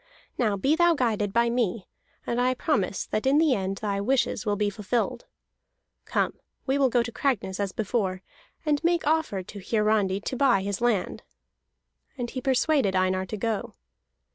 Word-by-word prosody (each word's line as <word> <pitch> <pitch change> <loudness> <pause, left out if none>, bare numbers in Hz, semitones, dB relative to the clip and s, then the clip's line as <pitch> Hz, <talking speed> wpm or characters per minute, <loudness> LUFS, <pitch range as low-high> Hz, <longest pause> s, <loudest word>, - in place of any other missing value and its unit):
Now 215 -5 +1
be 275 +10 +2
thou 345 0 +4
guided 215 -6 0
by 235 +2 +2
me, 230 -5 -1 0.4
and 240 +1 0
I 255 +1 +2
promise 210 - -1
that 215 +4 -2
in 275 +2 +4
the 310 -3 +4
end 195 -2 -2
thy 200 -1 -2
wishes 245 -2 0
will 205 - +2
be 205 0 0
fulfilled. 210 +4 -2 0.8
Come, - - -1 0.3
we 275 +1 +1
will 270 -2 +4
go 240 -1 +2
to 235 - -6
Cragness 215 -8 -1
as 200 -2 -1
before, 190 -3 -2 0.4
and 295 0 +1
make 340 0 +2
offer 310 -11 +1
to 200 +3 -10
Hiarandi 210 -1 +1
to 260 - -4
buy 250 -7 +3
his 200 +2 -3
land." 235 -6 0 1.0
And 240 -2 -4
he 260 - -4
persuaded 265 -5 +2
Einar 185 0 +1
to 215 - -5
go. 220 0 -3
225 Hz, 170 wpm, -26 LUFS, 200-265 Hz, 1.0 s, thou